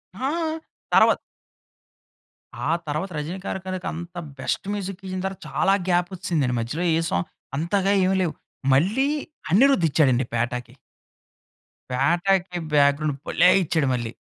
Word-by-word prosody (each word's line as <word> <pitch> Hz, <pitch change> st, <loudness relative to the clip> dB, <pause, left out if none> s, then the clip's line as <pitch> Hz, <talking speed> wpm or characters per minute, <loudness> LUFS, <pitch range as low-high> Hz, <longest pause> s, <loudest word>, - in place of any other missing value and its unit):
ఆ! 260 Hz, +7 st, -2 dB, 0.7 s
తర్వా -, -, +7 dB, 1.6 s
ఆ -, -, +3 dB, 0.2 s
తర్వాత 155 Hz, +6 st, -2 dB
రజినీకాంత్ 175 Hz, +6 st, -5 dB
గారి 190 Hz, -, -3 dB
కనుక, 185 Hz, -1 st, -4 dB
అంత 175 Hz, +1 st, -8 dB, 0.2 s
బెస్ట్ -, -, -2 dB
మ్యూజిక్ 195 Hz, -1 st, -5 dB
ఇచ్చిన 185 Hz, -1 st, -4 dB
తర్వాత 190 Hz, 0 st, -4 dB
చాలా 195 Hz, -, +2 dB, 0.2 s
గ్యాప్ 175 Hz, 0 st, +2 dB
వచ్చిసిదండి. 155 Hz, -8 st, 0 dB
మధ్యలో 150 Hz, +10 st, -2 dB
ఏ -, -, +2 dB
సాంగ్ 180 Hz, -, -1 dB, 0.3 s
అంతగా 195 Hz, +5 st, +1 dB
ఏమి 190 Hz, +1 st, +2 dB
లేవు. 170 Hz, -4 st, 0 dB, 0.4 s
మళ్ళీ 210 Hz, -, +3 dB, 0.4 s
అనిరుద్ 225 Hz, -2 st, +5 dB
ఇచ్చాడండి 130 Hz, -5 st, +3 dB
'పేటా'కి. 120 Hz, +1 st, -2 dB, 1.2 s
'పేటా'కి 175 Hz, +7 st, +1 dB, 0.2 s
బ్యాగ్రౌండ్ 145 Hz, 0 st, +3 dB
భలే 180 Hz, -, +5 dB
ఇచ్చాడు 160 Hz, -4 st, +1 dB
మళ్ళీ. 120 Hz, -2 st, -2 dB
175 Hz, 125 wpm, -24 LUFS, 140-190 Hz, 1.6 s, తర్వా